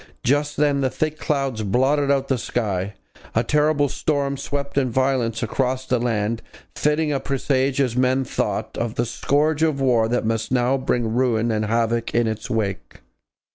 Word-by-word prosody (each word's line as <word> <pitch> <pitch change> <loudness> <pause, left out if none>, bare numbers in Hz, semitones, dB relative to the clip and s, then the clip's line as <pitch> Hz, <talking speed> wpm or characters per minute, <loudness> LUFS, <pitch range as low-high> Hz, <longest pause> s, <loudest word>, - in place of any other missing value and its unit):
Just 145 +3 +1
then 145 -1 +2
thick 155 +3 -2
clouds 135 -8 -1
blotted 135 +7 +2
out 135 -1 +2
the 130 -2 0
sky; 100 -4 -2 0.4
a 115 - +3
terrible 150 +2 +2
storm 140 0 -1
swept 140 +1 -4
in 135 -2 +2
violence 125 -2 0
across 130 +3 -1
the 125 -2 +1
land, 115 -1 -1 0.3
a - - -9
fitting 150 -1 +1
presage, 135 0 0
as 125 -4 +1
men 130 +1 +2
thought, - - -2
of 120 -1 -2
the 120 - 0
scourge 145 +6 0
of 155 -3 +2
war 120 -4 +3
that 120 0 0
must 115 +1 -1
now 125 +1 +2
bring 120 -4 -1
ruin 120 -2 +1
and 110 -1 0
havoc 115 +1 0
in 120 0 +3
its 110 -1 -3
wake. 100 - -3
130 Hz, 170 wpm, -22 LUFS, 115-140 Hz, 0.4 s, a